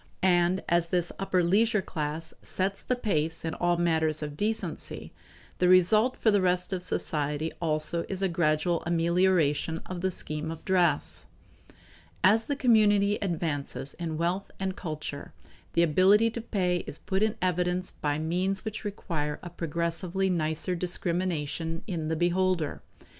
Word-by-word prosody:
And 180 0 +3
as 170 0 +2
this 175 0 0
upper 185 -2 +1
leisure 210 +3 +3
class 155 0 -4
sets 195 +1 -2
the 250 - 0
pace 160 -9 -1
in 160 - -2
all 175 0 +1
matters 160 -2 +2
of 150 -1 -5
decency, 215 +6 -2 0.5
the 180 - +3
result 215 +7 +5
for 220 - +3
the 205 -1 +3
rest 180 +1 +1
of 185 - -2
society 150 -3 -1
also 160 +1 0
is 195 0 -3
a - - +4
gradual 165 0 +1
amelioration 170 -2 +2
of 180 -1 -6
the 190 - +1
scheme 155 -3 -1
of 160 0 -7
dress. 175 -6 +1 1.0
As 225 +3 +5
the 285 - -1
community 210 -5 +4
advances 160 -7 -2
in 165 -2 -3
wealth 175 +4 -1
and 190 -1 -2
culture, 155 -5 -6 0.4
the 170 - +4
ability 195 +8 +4
to 235 - -5
pay 185 -6 0
is 145 - -7
put 190 +1 -2
in 215 0 +2
evidence 180 0 0
by 145 -1 -2
means 180 +5 -1
which 215 -1 -5
require 165 -8 -3
a 175 - -7
progressively 170 +3 -1
nicer 160 +1 -1
discrimination 170 -2 -2
in 165 -6 -3
the 160 - 0
beholder. 175 -1 0
175 Hz, 150 wpm, -28 LUFS, 160-190 Hz, 1.0 s, result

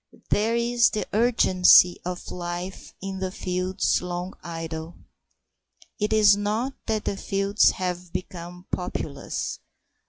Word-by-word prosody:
There 220 +3 +2
is 235 -1 +3
the 215 - -2
urgency 190 -6 +5
of 180 0 -5
life 175 +1 -6
in 190 -1 -3
fields 185 0 -1
long 180 +1 -4
idle. 165 0 -6 1.0
It 210 0 0
is 210 -2 +6
not 215 +6 -1
that 220 -2 -1
the - - -1
fields 195 +1 +2
have 180 -1 -4
become 180 -1 -7
populous. 180 - -4
185 Hz, 115 wpm, -25 LUFS, 180-210 Hz, 1.0 s, is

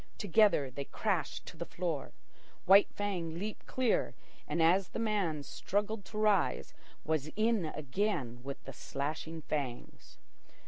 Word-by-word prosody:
Together 195 -8 +4
they 140 +2 -5
crashed 185 -6 -1
to - - -9
the 160 - -4
floor. 170 -4 -3 0.5
White 195 +2 +7
Fang 175 -5 -2
leaped 210 +4 -5
clear, 255 -3 +1 0.3
and, - - -1
as 175 +4 +4
the - - -6
man 200 -10 0
struggled 205 +5 -2
to 215 - -8
rise, 210 -2 +2 0.3
was 155 -2 0
in 215 -3 +2
again 150 - -2
with 135 +2 -7
the 135 - -8
slashing 155 +5 -4
fangs. 135 -6 -5
170 Hz, 135 wpm, -33 LUFS, 150-205 Hz, 0.5 s, White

